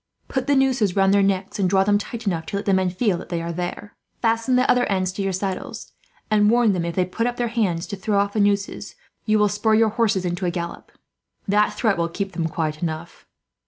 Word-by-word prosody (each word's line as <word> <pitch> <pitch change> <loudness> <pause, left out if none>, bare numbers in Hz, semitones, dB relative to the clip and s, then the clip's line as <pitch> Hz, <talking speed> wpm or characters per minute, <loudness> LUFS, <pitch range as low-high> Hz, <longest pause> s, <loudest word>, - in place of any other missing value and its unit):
Put 265 - -2
the 285 - +3
nooses 260 -8 +2
round 195 0 +4
their 200 - +4
necks, 195 0 -1
and 190 -2 +2
draw 190 0 +4
them 205 +1 +2
tight 235 +2 -7
enough 170 -5 -1
to - - -4
let 200 - -3
the 195 - +2
men 190 -1 +2
feel 185 -1 0
that - - -10
they 170 - -2
are 170 0 -4
there. 180 +4 -5 0.2
Fasten 230 +2 +1
the 255 +1 +3
other 245 0 +3
ends 185 -2 0
to 190 - -5
your 195 0 0
saddles, 190 0 -4 0.4
and 210 -1 +4
warn 235 -1 +4
them, 175 -2 -1
if 170 -1 -4
they 185 - +2
put 230 +6 -2
up 245 - -3
their 240 -1 -1
hands 195 -8 0
to 200 - -5
throw 200 +1 -1
off 200 0 +1
the 215 - 0
nooses, 200 -1 0 0.3
you 215 0 +4
will 210 0 +4
spur 215 +2 +1
your 225 0 +4
horses 210 -4 0
into 180 +1 -2
a - - +2
gallop. 170 -1 -6 0.6
That 210 +1 +2
threat 210 -7 +1
will 170 0 0
keep 195 +3 -4
them 165 -3 -2
quiet 155 -1 -3
enough." 165 0 -5
200 Hz, 245 wpm, -22 LUFS, 180-215 Hz, 0.6 s, round